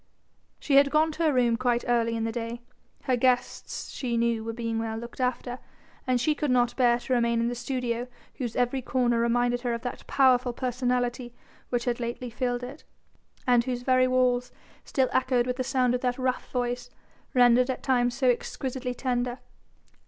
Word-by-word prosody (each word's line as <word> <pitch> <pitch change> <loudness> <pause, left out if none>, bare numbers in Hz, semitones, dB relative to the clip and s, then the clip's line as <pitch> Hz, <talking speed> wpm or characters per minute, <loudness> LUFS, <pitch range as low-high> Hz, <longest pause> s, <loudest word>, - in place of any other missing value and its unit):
She 275 -2 +2
had 280 0 +6
gone 315 +2 +3
to 320 +2 -3
her 310 - +4
room 245 -3 +3
quite 245 -1 0
early 230 -1 +1
in 225 - -2
the 225 - -1
day; 235 0 -5 0.4
her 255 - +2
guests 250 0 -1
she 240 -3 -2
knew 230 -1 +1
were 225 - -3
being 230 -1 -3
well 225 0 -3
looked 235 +3 -7
after, 250 0 -2 0.5
and 255 -1 +2
she 300 +6 +2
could 295 -1 -2
not 245 -1 +2
bear 240 -2 +4
to 250 +1 -3
remain 235 -1 +2
in 235 +1 +1
the - - -2
studio 245 -1 -3 0.3
whose 240 -4 -4
every 250 +2 0
corner 245 -2 +1
reminded 245 +1 +1
her 240 -2 -1
of 235 - -7
that 245 - -6
powerful 255 -2 +3
personality 245 -1 -2 0.3
which 240 -1 -1
had 245 -1 -1
lately 240 +1 -4
filled 245 +1 -2
it, 265 +5 -8 0.6
and 245 -2 +4
whose 245 -1 -3
very 255 0 +4
walls 250 -1 +1 0.3
still 265 -2 +1
echoed 255 -2 +2
with 250 0 -2
the 255 - -1
sound 255 -2 +1
of 250 - -1
that 250 -1 0
rough 255 -1 -2
voice, 245 0 -2 0.5
rendered 245 +1 +5
at 260 - -3
times 245 -2 +2
so 260 0 +1
exquisitely 250 +1 -1
tender. 245 -1 -1
245 Hz, 190 wpm, -27 LUFS, 240-255 Hz, 0.6 s, had